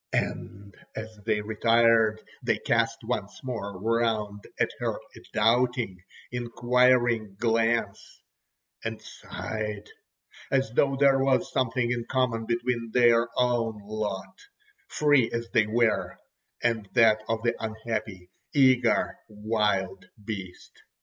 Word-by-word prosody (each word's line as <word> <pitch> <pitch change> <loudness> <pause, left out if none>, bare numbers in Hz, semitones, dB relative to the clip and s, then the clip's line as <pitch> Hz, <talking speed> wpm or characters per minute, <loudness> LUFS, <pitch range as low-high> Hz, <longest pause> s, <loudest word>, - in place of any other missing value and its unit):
And 100 0 -3 0.2
as 110 0 -7
they 105 -1 +1
retired, 115 0 +3 0.2
they - - +1
cast - - 0
once - - -4
more 100 -7 -5
round 110 -2 -1
at - - +1
her - - -1
a - - -14
doubting, 120 -5 +1 0.3
inquiring 120 -2 +2
glance 115 +1 -1 0.6
and - - -4
sighed—as 110 +4 -5
though 135 +3 +2
there 135 -1 +4
was 135 -1 +1
something 125 -1 0
in 120 -1 -2
common 125 -4 0
between 120 0 -1
their 120 -1 +4
own 120 -3 +1
lot, 105 -2 -5 0.5
free 145 -6 +3
as 115 0 -3
they 110 -1 +3
were, 115 +1 +1 0.5
and 115 -4 0
that 110 -3 +5
of 115 0 -1
the 120 - +2
unhappy, 110 -5 -5 0.2
eager 130 -3 +3
wild 105 -2 -1 0.2
beast. 95 -5 -8
115 Hz, 110 wpm, -27 LUFS, 110-120 Hz, 0.6 s, that